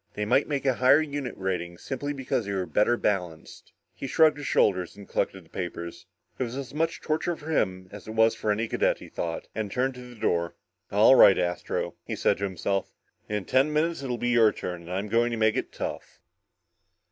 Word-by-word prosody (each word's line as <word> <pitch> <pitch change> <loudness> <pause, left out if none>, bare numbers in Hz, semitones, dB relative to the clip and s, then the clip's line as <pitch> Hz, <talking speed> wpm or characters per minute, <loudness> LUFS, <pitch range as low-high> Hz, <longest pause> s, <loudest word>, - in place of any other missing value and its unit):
They 105 - -2
might 125 +6 +3
make 140 -2 -2
a 135 - +4
higher 130 +4 +5
unit 145 -4 -4
rating, 90 -2 -3
simply 135 +7 -4
because 130 -6 -2
they 100 - -2
were 95 -2 -1
better 120 +6 +2
balanced. 90 -8 -3 0.2
He 135 - -6
shrugged 155 +2 +4
his 145 - -5
shoulders 90 -1 +2
and 100 - -11
collected 95 -3 -2
the - - -24
papers. 85 -2 -6 0.3
It - - +1
was 120 +1 -5
as 135 -2 -6
much 165 +3 -1
torture 160 +2 -1
for 155 0 -7
him, 95 -10 0
as 105 0 -10
it 110 - -6
was 115 0 +5
for 105 - -1
any 110 +2 0
cadet, - - +1
he - - -12
thought, 85 -1 -4
and 105 -2 -3
turned 130 +3 0
to 125 0 -11
the 120 -2 -14
door. 85 -4 0 0.4
"All 105 +5 +6
right, 100 -7 +8
Astro," 90 -1 -2
he - - -4
said - - +1
to 100 - 0
himself, 95 +1 -2 0.4
"in 105 -2 -2
ten 135 +4 +3
minutes 160 +1 0
it'll 125 -3 -3
be 120 - -1
your 115 -3 +5
turn 90 -1 -6
and 85 +1 -10
I'm 95 +3 -2
going 115 +3 +2
to 115 - -3
make 110 -1 +3
it - - -2
tough!" - - -6
110 Hz, 215 wpm, -27 LUFS, 95-135 Hz, 0.4 s, right